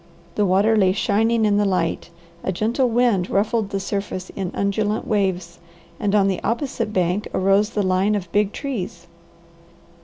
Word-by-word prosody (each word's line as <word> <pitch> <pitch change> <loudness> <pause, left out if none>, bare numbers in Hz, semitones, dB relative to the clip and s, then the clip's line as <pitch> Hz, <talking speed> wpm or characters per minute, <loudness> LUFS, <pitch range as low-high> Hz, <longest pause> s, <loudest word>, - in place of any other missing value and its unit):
The 205 +1 +1
water 200 +5 +3
lay 190 -3 +3
shining 220 +3 +1
in 205 -1 +3
the 205 - +3
light, 185 -4 -1 0.3
a - - -1
gentle 235 +7 0
wind 230 -6 +2
ruffled 215 +1 0
the 195 -1 -2
surface 195 -1 -4
in 190 -2 -4
undulant 205 +2 -1
waves, 185 -4 -1 0.4
and 205 0 0
on 200 -2 +4
the 190 -2 -1
opposite 230 -3 -2
bank 185 +1 0
arose 195 +2 +3
the 210 -3 -1
line 185 +3 +2
of 180 -4 -4
big 205 -1 +2
trees. 255 -10 -5
200 Hz, 160 wpm, -22 LUFS, 190-215 Hz, 0.4 s, on